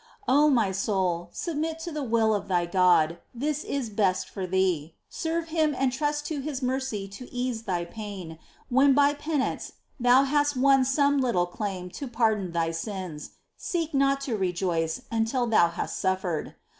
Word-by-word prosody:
5. 260 - +3
O 300 +1 +6
my 230 -8 +3
soul, 185 -3 -1
submit 320 -1 -3
to 330 +1 -6
the 300 -1 -3
will 225 -4 +2
of 205 - -2
thy 175 -2 +1
God: 170 -2 +3 0.2
this 295 +4 -2
is 260 -6 -3
best 195 -3 +1
for 190 -2 -5
thee: 180 -4 0
serve 330 0 -3
Him 310 -3 +1
and 260 -1 +1
trust 295 +2 -1
to 310 -3 -3
His 275 -2 -4
mercy 255 -6 -2
to 225 +6 -10
ease 245 -2 -2
thy 175 -2 -1
pain, 185 -5 -8 0.3
when 270 +2 +5
by 285 0 +5
penance 290 -1 -2 0.3
thou 245 +2 +5
hast 290 0 +1
won 270 0 +5
some 280 +1 +3
little 235 -9 +2
EXCLAMATIONS. 195 +2 -4
87 - - -10
claim 275 - -5
to 235 - -18
pardon 220 -5 +2
for 170 - -10
thy 165 -1 0
sins: 175 -3 -5 0.3
seek 330 -3 -3
not 275 0 +2
to 265 -5 -2
rejoice 175 -4 -1
until 230 +2 +1
thou 220 -7 +4
hast 170 - -4
suffered 185 -4 -1
230 Hz, 180 wpm, -27 LUFS, 185-280 Hz, 0.3 s, O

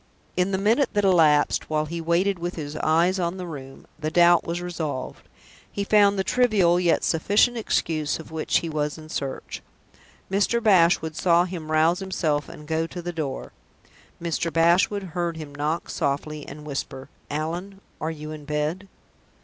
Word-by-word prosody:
In 180 +1 +1
the 190 - 0
minute 225 +8 +2
that 205 -1 +1
elapsed, 160 -6 +3
while 155 -1 0
he 170 +2 -5
waited 175 +3 +1
with 175 +1 -4
his 150 -2 -6
eyes 170 +4 +2
on 175 +1 -1
the 180 - -5
room, 135 -5 -9
the 155 0 -2
doubt 175 +1 +5
was 170 +1 -3
resolved 165 -6 -5 0.4
he 200 - -2
found 205 -1 +4
the 190 - +1
trivial, 200 -8 +3
yet 175 -2 +2
sufficient, 205 +9 +3
excuse 160 -9 -1
of 160 - -11
which 160 -1 0
he 170 - -4
was 150 -1 -2
in 155 0 -12
search. 140 -3 -5 0.7
Mr. 200 +4 +2
Bashwood 170 -6 +4
saw 170 0 +4
him 170 -4 -6
rouse 160 +3 +3
himself 165 -6 -1
and 150 - -11
go 160 +1 0
to 175 +1 -8
the 175 0 -4
door. 145 -5 -4 0.7
Mr. 170 0 -2
Bashwood 175 +5 +3
heard 170 -2 -2
him 150 -3 -8
knock 150 +4 -2
softly, 145 +2 -3
and 150 +1 -9
whisper, 135 -2 -5 0.2
"Allan, 170 +6 -4 0.2
are 155 - -1
you 155 -1 -7
in 155 -1 -8
bed?" 150 +6 -2
165 Hz, 170 wpm, -24 LUFS, 155-185 Hz, 0.7 s, doubt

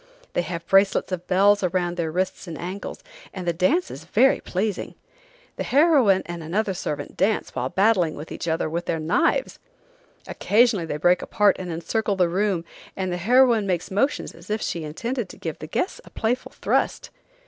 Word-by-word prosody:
They - - +1
have 170 -1 -5
bracelets 195 +1 +3
of 180 -1 -4
bells 200 +2 +4
around 175 -1 0
their 165 -2 -2
wrists 185 +2 -2
and 165 -2 -6
ankles, 185 +3 -6 0.3
and 180 -2 -5
the 170 - +2
dance 235 - +1
is 140 - -8
very 235 +10 +3
pleasing. 200 +2 -3 0.6
The - - -2
heroine 270 - +4
and 170 -1 -6
another 195 +5 -1
servant 150 -4 -5
dance 205 +3 0
while - - -2
battling 190 -5 +2
with 150 - -9
each - - -5
other 160 -1 0
with 170 +2 -3
their 165 - -1
knives. 170 - +1 0.7
Occasionally 210 -5 +2
they 150 - -3
break 175 +4 +3
apart 210 -2 +3
and 180 -2 -5
encircle 200 +6 -1
the 180 -2 +2
room, 190 -2 0 0.3
and 190 -1 -2
the 175 - -2
heroine 235 +2 +4
makes 180 +1 -2
motions 270 +10 0
as 170 +3 -15
if 215 +1 0
she 170 -5 -3
intended 230 - -4
to - - -11
give 160 -2 -5
the 155 - -7
guests 250 - -2
a - - -15
playful 240 +3 -2
thrust. - - -1
185 Hz, 185 wpm, -24 LUFS, 170-215 Hz, 0.7 s, bells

